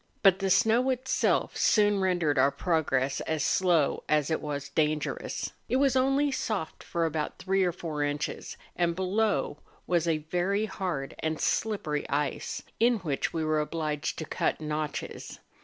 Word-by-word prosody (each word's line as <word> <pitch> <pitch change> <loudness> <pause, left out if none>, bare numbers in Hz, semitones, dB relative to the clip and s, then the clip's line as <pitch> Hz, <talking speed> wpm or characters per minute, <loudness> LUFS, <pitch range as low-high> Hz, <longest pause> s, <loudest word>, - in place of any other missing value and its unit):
But 195 -2 +6
the 195 -1 0
snow 230 +7 +4
itself 260 0 +1
soon 205 -2 +3
rendered 175 -7 +1
our 135 - +5
progress 140 -5 0
as 160 -2 0
slow 175 -6 +2
as 150 0 +2
it 160 - 0
was 145 -1 -4
dangerous. 150 0 -1 0.2
It - - +1
was 270 -1 +3
only 270 +2 +3
soft 210 -10 -3
for 170 -1 -1
about 155 -1 -2
three 190 0 +1
or 180 - +2
four 160 -3 -4
inches, 145 +1 -3 0.2
and 170 -1 +1
below 200 +4 0 0.3
was 170 -1 +1
a 165 -2 +2
very 195 +4 +1
hard 175 -9 -3
and 160 -1 -2
slippery 175 -9 -1
ice, 145 -1 -2 0.2
in 235 +1 +4
which 145 -6 -1
we 160 -1 -2
were 155 0 +2
obliged 150 -1 -2
to 160 - -4
cut - - -1
notches. 155 -1 -4
165 Hz, 155 wpm, -28 LUFS, 150-195 Hz, 0.3 s, But